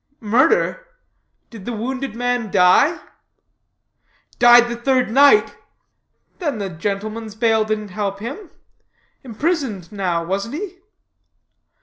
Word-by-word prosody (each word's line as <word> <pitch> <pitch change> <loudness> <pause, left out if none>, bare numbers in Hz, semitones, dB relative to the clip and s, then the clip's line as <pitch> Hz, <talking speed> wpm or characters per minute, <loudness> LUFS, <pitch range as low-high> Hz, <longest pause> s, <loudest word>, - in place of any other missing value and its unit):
"Murder? 260 - +1 0.6
Did 215 -5 -11
the 240 - -4
wounded 255 +2 -4
man 245 -2 -2
die?" 190 - +4 1.4
"Died 240 0 +7
the 240 - -4
third 255 0 0
night." 285 - +5 0.8
"Then 295 - -2
the 200 -2 -4
gentleman's 210 +5 -5
bail 220 -1 +2
didn't 215 -1 -3
help 200 0 -3
him. 275 - -8 0.7
Imprisoned 250 - -3
now, 180 -5 -2
wasn't 200 +8 -3
he?" 370 +1 -7
230 Hz, 105 wpm, -20 LUFS, 205-265 Hz, 1.4 s, Died